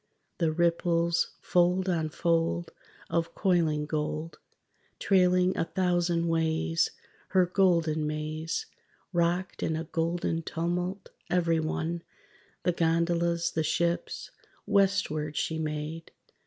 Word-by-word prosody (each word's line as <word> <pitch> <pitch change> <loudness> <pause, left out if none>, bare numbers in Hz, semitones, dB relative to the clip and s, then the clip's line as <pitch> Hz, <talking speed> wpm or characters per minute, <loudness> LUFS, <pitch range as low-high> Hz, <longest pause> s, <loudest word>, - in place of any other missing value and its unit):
The 165 -3 +2
ripples, 170 0 +1
fold 180 +1 +2
on 165 -4 0
fold 165 - 0 0.4
Of 165 0 -1
coiling 165 -6 +2
gold, 155 +1 -3 0.6
Trailing 180 -1 +3
a 165 - 0
thousand 175 -2 +1
ways 165 0 +1 0.4
Her 185 -1 +4
golden 170 -4 +2
maze, 155 - -3 0.5
Rocked 175 +2 0
in 160 - 0
a 160 - -2
golden 165 0 -1
tumult, 175 +4 -3 0.2
every 170 -2 +2
one, 160 +2 -2 0.6
The 180 - +3
gondolas, 170 0 +1
the 160 - 0
ships.. 170 +2 -1 0.3
Westward 195 -7 +1
she 160 0 -1
made 155 +1 -4
170 Hz, 105 wpm, -29 LUFS, 160-175 Hz, 0.6 s, Her